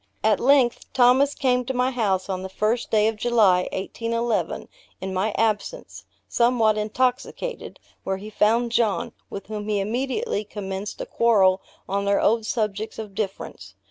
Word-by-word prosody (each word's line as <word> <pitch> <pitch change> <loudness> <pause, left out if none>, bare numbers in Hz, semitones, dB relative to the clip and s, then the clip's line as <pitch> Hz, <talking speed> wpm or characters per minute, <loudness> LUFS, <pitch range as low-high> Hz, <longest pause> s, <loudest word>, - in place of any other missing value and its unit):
At 215 -2 +3
length, 260 -2 +3
Thomas 260 +3 +4
came 250 -3 +1
to 265 - -3
my 250 +1 +1
house 200 -7 0
on 185 -2 -3
the 190 - -6
1st 215 +5 -1
day 215 -1 +3
of 220 -1 -1
July, 210 -6 +3
1811, 230 +4 -2 0.3
in 190 0 -5
my 190 +4 0
absence, 225 - -2 0.2
somewhat 235 -3 +3
intoxicated, 250 - -2 0.2
where 190 0 -2
he 210 +3 -9
found 230 +3 +2
John, 225 -4 +1 0.2
with 195 - -7
whom 210 0 -5
he 205 -1 +1
immediately 250 - -2
commenced 200 -1 -6
a - - -3
quarrel 195 -5 +3 0.3
on 200 +1 -1
their 200 0 +2
old 220 0 +2
subjects 215 -2 -2
of 215 -3 -7
difference. 195 -1 -5
220 Hz, 155 wpm, -24 LUFS, 200-240 Hz, 0.3 s, Thomas